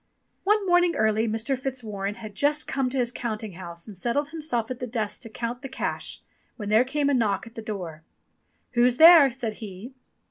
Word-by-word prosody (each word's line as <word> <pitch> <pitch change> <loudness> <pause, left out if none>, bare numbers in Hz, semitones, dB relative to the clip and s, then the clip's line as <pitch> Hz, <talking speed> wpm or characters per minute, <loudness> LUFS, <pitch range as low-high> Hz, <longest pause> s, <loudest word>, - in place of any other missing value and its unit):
One 415 0 +3
morning 355 -1 +3
early 220 +1 +2
Mr. 225 +4 -1
Fitzwarren 220 -7 -4
had 215 -3 -9
just 295 +7 +1
come 270 -2 0
to 270 - -3
his 240 -2 +1
counting 220 -4 -4
house 170 -1 -9
and 210 - -10
settled 245 +9 -1
himself 295 -8 -2
at 250 - -5
the 250 - -4
desk 220 -3 -3
to 230 - -7
count 235 +2 -4
the 270 - -7
cash, 265 - -4 0.3
when 210 -4 -5
there 220 +3 +5
came 280 +2 -1
a 285 - +2
knock 210 -5 +1
at 230 - -13
the 225 - -7
door. 180 -8 -6 0.7
"Who's 245 0 +3
there?" 320 -4 +9
said 235 -3 -4
he. 210 +4 -8
235 Hz, 200 wpm, -26 LUFS, 215-270 Hz, 0.7 s, there